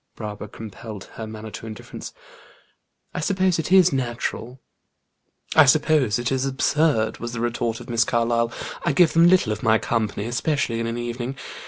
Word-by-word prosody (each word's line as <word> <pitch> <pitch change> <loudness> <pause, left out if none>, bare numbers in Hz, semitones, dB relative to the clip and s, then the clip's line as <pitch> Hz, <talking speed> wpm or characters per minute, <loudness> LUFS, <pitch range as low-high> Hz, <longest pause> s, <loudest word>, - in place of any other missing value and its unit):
Barbara 105 -1 -6
compelled 110 -1 -9
her 110 - -6
manner 110 0 -8
to 115 - -8
indifference. 110 -2 -8 1.0
"I - - -3
suppose 185 0 +1
it 160 - -3
is 185 -3 +6
natural." 125 0 -3 1.0
"I 155 - +8
suppose 140 -5 +3
it 120 +1 -2
is 130 -1 0
absurd," 135 -4 +1
was 120 +1 -5
the 115 - -4
retort 120 -1 -1
of - - -11
Miss 120 -1 +2
Carlyle. 115 0 +1 0.3
"I 170 - +1
give 170 +3 +4
them 165 +1 +6
little 175 -11 +4
of 105 - -7
my 110 0 +4
company, 110 -3 -2
especially 125 0 -1
in 115 - -2
an 115 +1 -3
evening. 120 +2 -4
120 Hz, 170 wpm, -23 LUFS, 115-145 Hz, 1.0 s, I